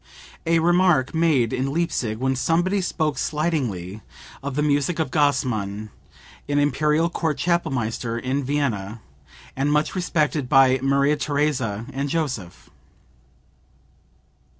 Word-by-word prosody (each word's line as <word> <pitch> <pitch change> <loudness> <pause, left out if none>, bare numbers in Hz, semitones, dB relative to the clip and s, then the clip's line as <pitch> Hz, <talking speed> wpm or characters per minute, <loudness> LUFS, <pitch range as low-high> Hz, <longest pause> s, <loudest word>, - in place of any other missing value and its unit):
(A 165 0 +4
remark 175 -5 +3
made 155 -8 +2
in 130 +2 -1
Leipsic 145 -9 -1
when 130 +1 0
somebody 175 +8 +1
spoke 155 -4 -1
slightingly 125 - -2 0.4
of 140 -1 -5
the 150 - +1
music 145 +3 +1
of 160 - -1
Gassmann, 110 - 0 0.6
an 145 - +1
Imperial 150 +3 +2
Court 165 -3 -2
Chapelmaster 120 -9 -1
in 130 +3 -2
Vienna, 120 -7 -2 0.6
and 140 +2 0
much 150 +1 +1
respected 155 -7 0
by 135 -1 +5
Maria 140 +2 +2
Theresa 140 -8 -1
and 140 +2 -2
Joseph.) 130 - -4
145 Hz, 115 wpm, -23 LUFS, 125-155 Hz, 0.6 s, by